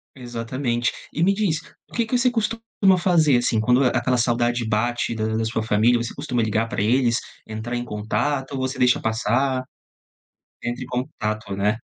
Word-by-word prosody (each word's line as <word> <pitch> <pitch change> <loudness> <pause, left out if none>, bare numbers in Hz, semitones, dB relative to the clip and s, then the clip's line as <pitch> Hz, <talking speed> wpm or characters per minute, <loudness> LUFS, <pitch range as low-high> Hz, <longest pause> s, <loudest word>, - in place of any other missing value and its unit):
Exatamente. 120 0 -2 0.2
E 160 - -1
me 195 - +4
diz, 195 -6 0 0.3
o - - -18
que 235 - +1
que 245 +3 0
você 250 +1 +3
costuma 225 -1 -1 0.4
fazer, 160 -7 +4
assim, 120 -2 +1
quando 125 +4 +3
a - - +5
aquela 125 0 +1
saudade 120 0 +1
bate 120 +2 0
da 110 -1 -1
da 110 - 0
sua 110 0 -1
família, 115 +2 +3
você 115 - -5
costuma 130 -4 -1
ligar 110 +1 0
pra 100 - -2
eles, 120 +2 +3 0.3
entrar 110 +3 -4
em 120 - -2
contato 125 +6 -2
ou 135 - -3
você 130 +1 -2
deixa 125 0 +4
passar? 125 +4 0 1.0
Entra 120 +2 -3
em - - -5
contato, 110 -6 -3
né? 105 +2 +1
120 Hz, 180 wpm, -23 LUFS, 110-135 Hz, 1.0 s, a